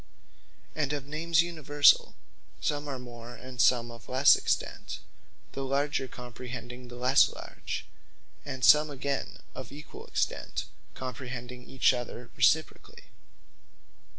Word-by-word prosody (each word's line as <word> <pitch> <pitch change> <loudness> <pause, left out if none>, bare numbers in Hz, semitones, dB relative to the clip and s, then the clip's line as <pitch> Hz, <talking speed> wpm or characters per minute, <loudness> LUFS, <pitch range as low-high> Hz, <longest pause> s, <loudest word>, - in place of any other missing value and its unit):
And 150 -2 -1
of 145 -2 -3
Names 160 +3 +2
Universall, 145 -4 +4 0.4
some 145 0 -1
are 140 - -3
of 125 - -7
more, 120 -1 -10
and 125 0 -4
some 120 -1 +4
of 115 -1 -13
lesse 130 +3 +7
extent; - - -2 0.5
the 135 - -4
larger 140 0 0
comprehending 125 0 -8
the 120 - -10
lesse 125 +3 +5
large: - - -6 0.6
and 130 -4 -2
some 150 0 +7
again 140 0 -3
of - - -8
equall 145 +2 -10
extent, - - -2 0.3
comprehending 125 -1 -7
each 130 0 +4
other 120 -1 -6
reciprocally. 150 +7 +1
130 Hz, 125 wpm, -29 LUFS, 125-145 Hz, 0.6 s, lesse